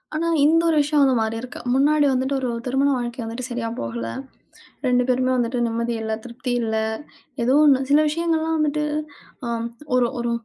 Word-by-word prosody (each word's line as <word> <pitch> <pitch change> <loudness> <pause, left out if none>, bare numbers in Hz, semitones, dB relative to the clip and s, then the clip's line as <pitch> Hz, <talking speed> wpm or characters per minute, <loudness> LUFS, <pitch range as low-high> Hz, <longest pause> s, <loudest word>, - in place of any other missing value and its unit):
ஆனா, 330 +2 0 0.2
இந்த 325 +2 +4
ஒரு 320 - +2
விஷயம் 295 0 +2
வந்து 265 -2 +3
மாறி 220 0 -1
இருக்கு. 250 - -8
முன்னாடி 290 +3 +3
வந்துட்டு, 260 +2 0
ஒரு 255 -2 -2 0.2
திருமண 270 +2 +2
வாழ்க்கை 240 +1 -4
வந்துட்டு 230 +3 -5
சரியா 240 -1 -2
போகல, 115 0 -4 0.8
2 250 0 +3
பேருமே 255 0 +1
வந்துட்டு 245 0 0
நிம்மதி 235 +1 -2
இல்ல, 220 0 -2
திருப்தி 250 +1 -5
இல்ல, 220 -1 -1 0.7
ஏதோ 255 - +2
ஒண்ணு. 270 -3 +5
சில 290 +1 +5
விஷயங்கள்லாம் 325 0 0
வந்துட்டு 300 -1 0 0.6
அ, - - -3 0.5
ஒரு 250 -1 +3
ஒரு 240 0 -1
255 Hz, 170 wpm, -22 LUFS, 235-295 Hz, 0.8 s, ஒண்ணு